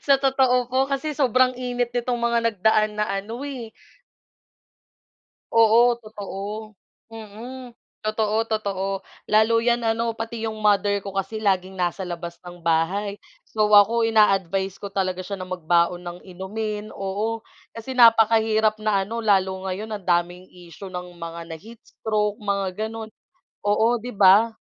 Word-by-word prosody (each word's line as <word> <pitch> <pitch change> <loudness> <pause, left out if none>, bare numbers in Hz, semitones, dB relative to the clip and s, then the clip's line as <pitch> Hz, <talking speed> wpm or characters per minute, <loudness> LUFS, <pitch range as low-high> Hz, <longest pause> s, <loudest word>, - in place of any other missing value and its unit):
Sa 275 -1 +5
totoo 260 -2 +2
po 260 +2 +1
kasi 295 +2 -2
sobrang 255 -2 +3
init 245 -1 -2
nitong 245 0 -1
mga 235 0 +1
nagdaan 215 +1 +2
na 210 - +1
ano, 215 +6 -4
eh. 245 -6 -7 1.8
Oo 230 +2 +6
totoo. 210 0 -7 0.3
Mm, 225 +3 -9 0.3
totoo, 215 0 0
totoo 200 -3 -1 0.4
lalo 220 +2 +4
yan 240 0 +2
ano 230 +1 +1
pati 225 0 -5
yung 220 -1 -3
mother 205 -1 +2
ko 195 -1 -7
kasi 195 +3 -3
laging 190 -2 0
nasa 180 +2 -1
labas 170 -1 -6
ng 175 0 -11
bahay. 185 +6 +1 0.3
So 215 -1 0
ako 210 +3 +6
ina-advise 195 -4 +2
ko 200 - -5
talaga 185 -2 -2
siya 195 +1 -6
na 185 - -6
magbaon 175 0 +1
ng 175 0 -7
inumin, 210 +3 -5
oo 210 +4 -3 0.2
kasi 230 +3 -7
napakahirap 220 -2 +5
na 200 -3 +1
ano 230 +2 -4
lalo 190 -2 +1
ngayon 215 +3 -4
ang 200 - -6
daming 175 +1 0
issue 180 +2 -11
ng 180 -1 -7
mga 170 0 -7
na-heatstroke 210 +1 -4
mga 200 -1 -1 0.2
gano'n 220 0 -7 0.6
oo, 210 +2 +3
'di 245 +3 -7
ba? 205 +4 +5
215 Hz, 140 wpm, -23 LUFS, 190-230 Hz, 1.8 s, Oo